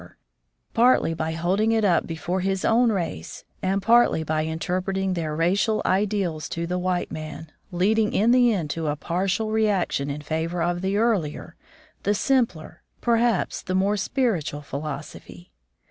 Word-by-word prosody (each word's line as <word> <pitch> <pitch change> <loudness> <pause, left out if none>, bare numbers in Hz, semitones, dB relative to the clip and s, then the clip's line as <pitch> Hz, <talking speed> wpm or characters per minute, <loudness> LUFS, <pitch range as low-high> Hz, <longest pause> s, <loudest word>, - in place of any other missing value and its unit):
Foreword - - -16 0.6
partly 240 -7 +4
by 160 0 -2
holding 190 +7 +1
it 220 -2 +2
up 175 -4 +2
before 170 +3 -3
his 190 0 -1
own 235 +1 +4
race, 170 - -4 0.2
and 190 +1 0
partly 235 -7 +4
by 155 0 0
interpreting 185 +4 -2
their 160 -3 -3
racial 195 +7 +1
ideals 190 -5 0
to 170 0 -3
the 180 +1 -2
white 180 0 -1
man, 155 0 -7 0.2
leading 210 +5 +2
in 220 +4 +3
the 245 -1 +5
end 170 -8 -2
to 160 0 -3
a 145 - 0
partial 190 +7 -1
reaction 200 -10 +1
in 140 +1 -4
favor 165 +3 -2
of 175 0 -1
the 190 +1 0
earlier, 180 -8 -1 0.5
the 205 - +1
simpler, 235 - 0 0.2
perhaps 235 0 +1
the 185 - -3
more 195 +2 +2
spiritual 195 - -1
philos 145 +1 -5
ophy. 90 -1 -13
185 Hz, 160 wpm, -24 LUFS, 160-210 Hz, 0.6 s, the